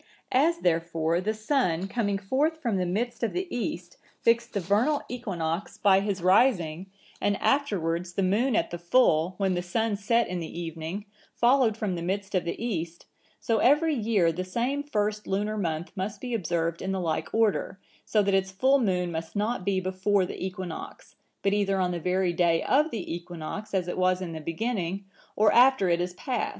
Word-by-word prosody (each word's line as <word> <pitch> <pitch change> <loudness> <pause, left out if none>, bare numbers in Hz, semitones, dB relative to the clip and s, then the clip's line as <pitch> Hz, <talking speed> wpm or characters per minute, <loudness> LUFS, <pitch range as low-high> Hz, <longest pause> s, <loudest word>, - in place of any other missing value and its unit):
As, 315 +7 +3
therefore, 165 0 +1
the 215 +3 -1
sun, 215 - 0
coming 205 -2 -1
forth 280 +11 0
from 235 -9 -1
the 180 -1 0
midst 235 +7 -2
of 230 - -1
the 365 +1 -1
east, 175 -7 -4 0.2
fixed 235 0 +2
the 200 - 0
vernal 210 - +1
equinox 190 -7 -3
by 195 -1 +5
his 195 -3 -2
rising, 185 -4 +3 0.3
and 205 -1 +1
afterwards 180 - 0
the 195 - 0
moon 220 +7 +2
at - - 0
the 175 - -5
full, 175 -3 +3
when 195 -2 +1
the 175 - -1
sun 215 +4 -1
set 230 +4 +1
in 180 0 -3
the 165 0 -6
evening, 165 +4 -5 0.3
followed 240 -3 +3
from 210 -4 -2
the 170 - -4
midst 195 +3 -3
of 185 -2 +1
the 170 - -3
east; 170 -8 -4 0.3
so 225 -2 0
every 300 +5 +4
year 210 - +2
the 180 +3 -3
same 240 +9 -1
first 210 -6 -2
lunar 210 +2 -1
month 170 -4 -2
must 200 +1 -4
be 245 +2 -5
observed 170 -5 -1
in 190 - -2
the 190 - -1
like 165 -3 -2
order, 220 -3 +1 0.3
so 210 -2 +2
that 200 0 +1
its 190 0 +2
full 260 +9 +3
moon 180 -6 0
must 160 +2 -5
not 210 0 -1
be 195 0 +1
before 185 +1 +1
the - - -6
equinox; 185 -3 -6 0.3
but 195 - +2
either 195 -2 +1
on 180 -1 +1
the 175 - -3
very 180 +1 0
day 170 -1 +2
of 300 +4 +3
the 210 - -4
equinox, 175 +4 -6
as 185 -3 0
it 180 - -3
was 185 0 +2
in 180 -3 -5
the 160 - -6
beginning, 190 +2 -3 0.3
or 215 0 +4
after 250 -6 +5
it 170 0 +2
is 180 0 -3
past. 245 +3 -2
195 Hz, 195 wpm, -27 LUFS, 175-225 Hz, 0.3 s, by